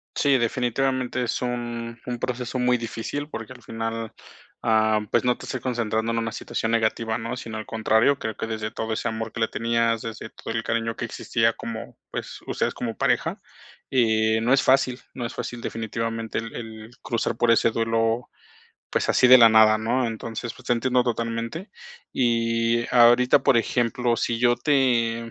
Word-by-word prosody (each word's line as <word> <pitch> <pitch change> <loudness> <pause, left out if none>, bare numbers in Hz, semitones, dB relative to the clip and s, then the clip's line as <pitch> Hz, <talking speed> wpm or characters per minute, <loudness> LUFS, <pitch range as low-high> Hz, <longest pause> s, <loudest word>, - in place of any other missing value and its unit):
Sí, 140 -2 +3
definitivamente 125 +1 0
es 115 - -2
un 120 -1 -4
un 120 -1 -3
proceso 125 +1 -3
muy 125 0 +3
difícil 120 +6 -5
porque 115 +3 -7
al 125 - -16
final, 115 0 -4 0.5
ah, 110 -1 +3
pues, 120 - +2
no 125 -1 +2
te - - -9
estoy 130 - -4
concentrando 115 -2 -1
en 115 - 0
una 115 -1 -2
situación 110 0 -3
negativa, 110 0 0
¿no? 115 +2 -4
Sino 115 -3 -7
al 110 - -5
contrario, 110 +5 +2
creo 110 -1 -4
que 110 - -4
desde 110 -1 -4
todo 110 -1 -4
ese 110 - -1
amor 110 -1 -4
que 115 - -6
le 110 - +2
tenías, 115 0 0
desde 115 0 -6
todo - - -7
el 115 0 -1
cariño 115 0 -2
que 120 - -3
existía 115 0 0
como, 115 -1 -7
pues, - - -6
ustedes - - -1
como 115 -2 -4
pareja, - - 0 0.5
eh, 110 -3 +2
no 120 +3 +2
es 135 - +4
fácil, 130 -1 +2
no 125 - -5
es 115 - -4
fácil 120 -1 -5
definitivamente 115 0 -3
el 115 0 -6
el 110 -1 -8
cruzar 115 -1 -2
por 120 - +2
ese 115 0 +4
duelo, 115 +1 0 0.6
pues, - - 0
así - - +5
de 130 +1 +9
la 115 -1 +9
nada, 110 -1 +6
¿no? 120 +3 0
Entonces, 115 +1 -5
pues, - - -16
te - - +2
entiendo 125 +1 +2
totalmente. 115 - -3 0.4
Y 115 -1 +1
ahorita, 120 +1 +6
por 125 - +4
ejemplo, 120 +1 +1
si 115 - -1
yo 120 0 +4
te 115 -5 +1
115 Hz, 185 wpm, -24 LUFS, 115-125 Hz, 0.6 s, de